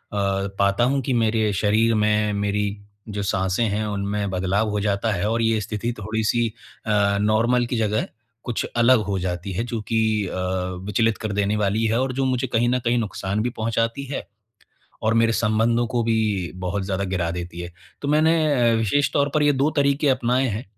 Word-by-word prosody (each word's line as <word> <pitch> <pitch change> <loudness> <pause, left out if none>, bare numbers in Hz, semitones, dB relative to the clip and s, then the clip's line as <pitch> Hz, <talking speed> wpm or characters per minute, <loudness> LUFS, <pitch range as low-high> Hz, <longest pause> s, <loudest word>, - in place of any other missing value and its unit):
पाता 100 +1 0
हूँ 135 +3 +2
कि 130 +1 -1
मेरे 110 -2 +2
शरीर 110 +3 +2
में, 105 0 +2
मेरी 100 0 0 0.4
जो 100 -1 -3
साँसें 95 +2 0
हैं, 105 +2 -1
उनमें 100 0 -2
बदलाव 95 +4 0
हो 105 0 -1
जाता 100 +2 0
है 100 -1 -1
और 115 +1 0
ये 115 -1 +2
स्थिति 110 +2 -3
थोड़ी 110 +2 -2
सी 120 +2 +2 0.4
अ, 100 -2 +2
नॉर्मल 115 +4 +2
की 120 - -3
जगह 110 -1 0 0.4
कुछ 120 -3 -2
अलग 120 0 +5
हो 100 -1 -1
जाती 90 +1 -3
है 95 - -1
जो 120 -1 -4
कि 115 +2 -2 0.3
अ, - - -6 0.5
विचलित 110 +2 +1
कर 110 -2 -4
देने 100 +1 0
वाली 105 +2 +1
है 115 +2 +1
और 130 0 -1
जो 135 +1 0
मुझे 130 0 0
कहीं 120 +1 +3
न 125 +1 +1
कहीं 120 +1 +2
नुक़सान 100 -2 -2
भी 125 - 0
पहुँचाती 115 +3 -1
है। - - -5 0.8
और 110 +1 +2
मेरे 115 0 +3
संबंधों 115 +2 +1
को 120 +1 -1
भी 110 -6 0
बहुत 95 +2 -2
ज़्यादा 95 0 -2
गिरा 90 -3 -1
देती 85 0 -6
है। 85 0 -7 0.3
तो 140 - -2
मैंने 155 -5 +3
अ, - - +2
विशेष 115 +6 +1
तौर 145 0 +2
पर 155 - +3
ये 145 0 +4
2 140 +2 +1
तरीक़े 140 +1 +2
अपनाए 130 0 +2
हैं 110 +2 -4
110 Hz, 195 wpm, -23 LUFS, 100-120 Hz, 0.8 s, अलग